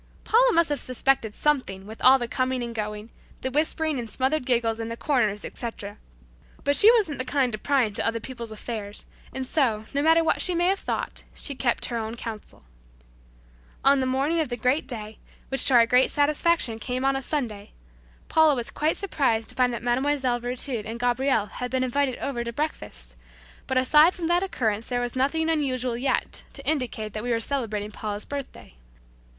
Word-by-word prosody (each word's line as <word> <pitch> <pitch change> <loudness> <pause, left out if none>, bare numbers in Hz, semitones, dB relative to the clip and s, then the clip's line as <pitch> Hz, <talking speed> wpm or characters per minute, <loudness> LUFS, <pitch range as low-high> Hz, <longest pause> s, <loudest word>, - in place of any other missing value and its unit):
Paula - - +4
must 335 -5 +3
have 290 - -1
suspected 255 -3 0
something 255 -11 0
with 220 +2 -10
all 260 +1 +8
the 240 -2 -3
coming 255 +1 -1
and 235 -1 -5
going; 210 0 -5 0.3
the 260 - -2
whispering 310 0 0
and 230 -2 -6
smothered 265 +3 -1
giggles 230 -2 +1
in 225 0 -4
corners, 220 -7 0
etc., 210 -3 -6 0.7
but 285 0 +2
she 430 +8 +9
wasn't 385 - +1
the - - 0
kind 260 -1 +1
to 215 - -5
pry 275 0 +2
into 210 -3 -2
other 230 0 0
people's 235 -1 -7
affairs, 210 -1 -5 0.3
and 265 0 -4
so, 235 -7 +1
no 280 - +1
matter 325 +2 +5
what 325 - +1
she 360 - +1
may 345 +1 +2
have 390 - +1
thought, - - -4
she 280 - -2
kept 250 -3 0
her 235 -1 -3
own 220 +1 -4
counsel. 225 -2 -8 1.2
On 275 0 +6
the 260 - 0
morning 275 +6 +1
of 310 -5 0
the 240 - -3
great 255 +4 +1
day, 220 -4 -6 0.3
which 270 - +3
to 265 - +4
our 235 -1 +7
great 250 +2 +4
satisfaction, 290 -4 +1
came 250 +4 -3
on 270 0 +2
a 270 - -2
Sunday, 230 -9 -3 0.6
Paula 315 -2 +4
was 240 -2 -3
quite 300 - -1
a - - -13
bit - - -10
surprised 260 - 0
to - - -8
find 250 -1 +2
that 235 - -5
Mlle. 255 0 +1
Virtud 245 -1 -2
and 225 +2 -6
Gabriel 245 -2 +1
had 250 +4 -6
been 260 +1 0
invited 260 0 0
over 240 -4 -3
to 235 - -4
breakfast; 305 +6 -5 0.5
but 260 - 0
aside 300 +7 +5
from 345 - -4
that 345 +2 +2
occurrence 230 - -1
there 245 -1 -1
was 245 0 -3
nothing 285 +5 +1
unusual 260 -6 0
as 235 - -5
yet 275 - -1
to - - -8
indicate 240 -8 -2
that 215 - -4
we 245 - -4
were 230 -1 +1
celebrating 220 -5 -2
Paula's 210 -1 -5
birthday. 280 - -7
255 Hz, 200 wpm, -25 LUFS, 230-285 Hz, 1.2 s, she